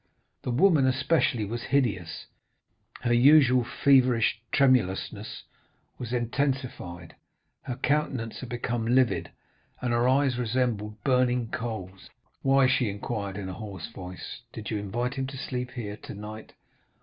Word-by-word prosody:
The - - -4
woman, 140 +1 +4
especially, 130 -3 +2
was 115 +3 -4
hideous; 115 -13 -1 0.8
her 120 -1 +1
usual 130 0 +6
feverish 125 -3 +3
tremulousness 125 -9 +1 0.6
was 120 -2 -5
intensified, 120 - -2 0.5
her 125 - -5
countenance 135 -4 -1
had 130 - -7
become 120 -1 -2
livid, 125 0 +2 0.5
and 125 -1 -1
her 120 +2 +3
eyes 130 -2 +2
resembled 110 -3 -1
burning 125 -3 +2
coals. 95 -5 -5 0.3
"'Why,' 135 0 +4
she 130 -3 +2
inquired 100 -1 -4
in 100 -2 -5
a 95 - -5
hoarse 100 -2 -7
voice, 90 -4 -8
'did 110 0 -7
you 105 - -1
invite 120 +5 -2
him 135 0 -3
to 135 0 -7
sleep 125 -1 -4
here 105 -4 -5
tonight? 105 +2 -9
120 Hz, 130 wpm, -27 LUFS, 105-130 Hz, 0.8 s, usual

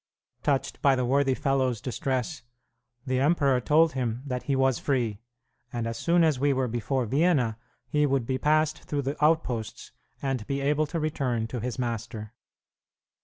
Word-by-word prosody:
Touched 140 -3 -1
by 140 -1 +5
the 125 -1 0
worthy 135 +1 +2
fellow's 130 -4 0
distress, 130 +4 -2 0.6
the 130 -1 0
emperor 140 -3 +3
told 160 +5 +4
him 125 -1 -2
that 125 -3 -3
he 140 - +3
was 135 -1 +2
free, 120 -6 -1 0.5
and 120 -1 -3
as 115 0 -3
soon 170 +5 +2
as 155 -5 +2
we 145 +1 +3
were 130 -1 0
before 120 +2 -1
Vienna 135 -3 +2 0.3
he 150 -2 +2
would 135 -3 +1
be 130 +1 -1
passed 155 0 +2
through 145 -1 -2
the 140 +2 -3
outposts, 140 -8 0 0.3
and 135 -5 -2
be 140 0 -1
able 150 +2 +1
to 165 +3 -3
return 130 -7 -1
to 120 +2 -5
his 120 0 -4
master. 115 -3 -4
135 Hz, 170 wpm, -27 LUFS, 120-145 Hz, 0.6 s, by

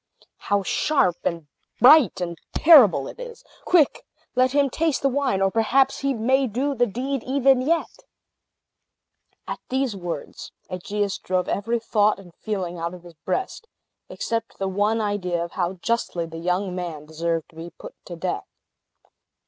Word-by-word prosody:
How 205 -1 0
sharp, 185 - +1
and 170 -2 -2 0.3
bright, 255 - +6
and 170 -1 -3 0.2
terrible 235 - +7
it - - -10
is! 485 -2 -9 0.2
Quick! 330 -6 +3 0.3
let 255 0 +3
him 285 0 +3
taste 310 +2 -1
the 275 - +4
wine; 265 -8 0
or 195 - +2
perhaps 260 +5 +2
he 275 0 0
may 260 +4 +2
do 260 +6 -1
the 245 -2 +2
deed 260 +5 -3
even 265 0 +3
yet." 330 - -1 1.5
At - - -4
these 260 -4 -1
words, 175 -5 -7 0.2
Aegeus 200 +2 -2
drove 185 0 -1
every 230 +4 -1
thought 215 -2 +1
and 180 -3 -14
feeling 185 -5 -4
out 170 +2 -4
of 175 - -14
his 175 -1 -13
breast, 380 - -4 0.4
except 230 -1 -4
the 195 - -2
one 205 +4 +1
idea 195 -4 -1
of 170 - -11
how 175 -1 -1
justly 185 -3 -2
the 165 0 -8
young 180 +2 -1
man 170 -5 -5
deserved 165 +1 -3
to - - -22
be 165 +1 -8
put - - -12
to - - -7
death. - - -3
210 Hz, 160 wpm, -23 LUFS, 180-265 Hz, 1.5 s, terrible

